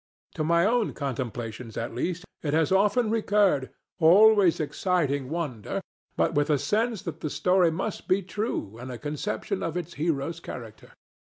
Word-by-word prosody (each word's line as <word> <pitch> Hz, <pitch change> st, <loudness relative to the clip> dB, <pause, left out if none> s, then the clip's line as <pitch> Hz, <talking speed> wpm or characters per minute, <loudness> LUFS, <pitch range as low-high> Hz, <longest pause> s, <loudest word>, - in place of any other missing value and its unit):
To 155 Hz, -, -2 dB
my 170 Hz, +2 st, +3 dB
own 230 Hz, 0 st, +1 dB
contemplations, 120 Hz, -4 st, -5 dB
at 115 Hz, -, -3 dB
least, 180 Hz, +9 st, -3 dB, 0.2 s
it 150 Hz, -1 st, -1 dB
has 160 Hz, +1 st, +2 dB
often 210 Hz, +4 st, +3 dB
recurred, 205 Hz, -10 st, +2 dB, 0.3 s
always 195 Hz, +2 st, +6 dB
exciting 150 Hz, -4 st, 0 dB
wonder, 145 Hz, -10 st, -3 dB, 0.4 s
but -, -, +2 dB
with 145 Hz, +1 st, +1 dB
a 150 Hz, -, +4 dB
sense 220 Hz, -, 0 dB
that 170 Hz, -5 st, -6 dB
the 155 Hz, -, -3 dB
story 180 Hz, +2 st, +3 dB
must 190 Hz, +6 st, -4 dB
be 190 Hz, +1 st, +2 dB
true 185 Hz, -, -4 dB
and 125 Hz, +1 st, -7 dB
a 125 Hz, -, -6 dB
conception 170 Hz, -, -3 dB
of 165 Hz, +1 st, -2 dB
its 170 Hz, -1 st, -5 dB
hero's 165 Hz, 0 st, -1 dB
character. 115 Hz, -9 st, -9 dB
165 Hz, 160 wpm, -27 LUFS, 140-195 Hz, 0.4 s, always